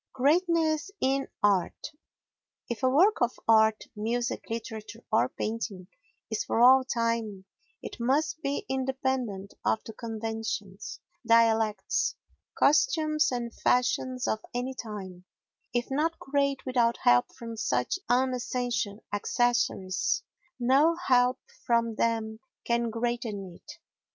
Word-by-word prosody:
Greatness 320 +4 +2
in 270 +1 +1 0.2
Art 195 -4 +1 0.8
If 235 -3 -4
a 260 - +3
work 360 +11 +4
of 240 0 +2
art—music, 220 +1 +1
literature 225 0 -6
or 120 +2 +3
painting—is 215 0 -5
for - - -1
all 260 +2 +7
time, 230 -5 -2 0.4
it - - -7
must 295 +6 0
be 280 -2 -2
independent 260 -6 -2
of 220 - +1
the 225 - -8
conventions, 220 -3 -5 0.2
dialects, 225 -2 +2 0.4
costumes 305 - +3
and 240 -2 -3
fashions 255 +1 +1
of 220 - 0 0.2
any 250 +2 -2
time; 195 -7 -8 0.5
if 240 +2 -2
not 315 +4 0
great 280 0 -1
without 240 -3 +2
help 120 0 +4
from 230 -1 -7
such 170 - -1
unessential 245 -4 0
accessories, 220 -3 0 0.4
no 275 +7 +4
help 255 -7 +2 0.2
from 235 -2 +1
them 220 -1 -1 0.3
can 235 0 +1
greaten 225 -5 -3
it. - - -13
235 Hz, 110 wpm, -28 LUFS, 220-265 Hz, 0.8 s, all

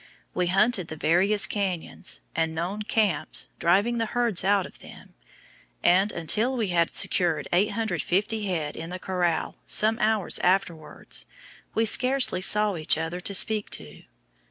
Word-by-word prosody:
We 180 -1 -1
hunted 195 0 +1
the 160 - -7
various 190 +7 +2
canyons 185 - -3
and 160 0 -1
known 180 +6 -4
"camps," 210 -6 0
driving 200 +8 +1
the 225 - -1
herds 235 -6 0
out 195 -1 +2
of - - -14
them; - - -14 0.7
and, 190 +4 +3
until 220 +10 -1
we 220 -5 -1
had 170 -1 +1
secured 165 -5 +2
850 205 +1 -1
head 160 -5 -3
in 165 +1 -7
the 180 - -6
corral 180 -3 -2
some 220 +2 +3
hours 215 -3 +1
afterwards, 175 -4 -2 0.5
we 225 - +2
scarcely 255 -4 +2
saw 210 0 +3
each 155 0 +3
other 165 +2 -4
to 200 - 0
speak 215 +1 +1
to. 75 0 -14
190 Hz, 145 wpm, -25 LUFS, 170-215 Hz, 0.7 s, and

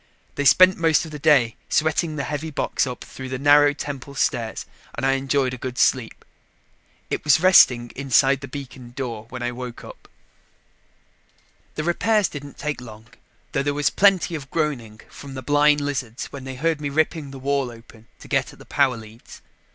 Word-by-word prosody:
They 145 - -3
spent 185 +6 +6
most 165 0 +2
of 160 - -10
the 150 - -7
day 140 -7 +3
sweating 160 +1 +1
the 140 - -3
heavy 150 +2 -4
box 145 - -1
up 125 - -6
through 130 -1 -9
the 130 - -3
narrow 145 +1 +5
temple 140 -1 -7
stairs 120 -3 -1 0.3
and 120 - -3
I 135 - +3
enjoyed 135 -1 0
a 130 - -7
good 125 0 -6
sleep. 125 -4 0 0.9
It - - -2
was 150 0 +4
resting 125 -10 +5
inside 135 0 +2
the 140 - -7
beacon 130 -3 -9
door 115 -5 -5
when 125 -1 -6
I 120 - -1
woke 125 -1 -8
up. - - -13 1.7
The 155 - -3
repairs 205 +5 +2
didn't 145 -1 -9
take 150 -3 -4
long, 110 -1 -12 0.4
though 135 - 0
there 145 +1 -1
was 145 0 +1
plenty 195 -3 +3
of 140 -4 -6
groaning 120 -9 -3
from 140 -1 -11
the 130 - -6
blind 145 +2 +3
lizards 130 -4 -4
when 135 -2 -8
they 130 0 -6
heard 155 +3 -1
me 145 - -2
ripping 155 0 -1
the 135 - -9
wall 135 -1 -1
open 115 -1 -15
to - - -12
get - - 0
at - - -17
the - - -15
power 135 -4 +1
leads. 110 +1 -14
140 Hz, 190 wpm, -22 LUFS, 125-150 Hz, 1.7 s, spent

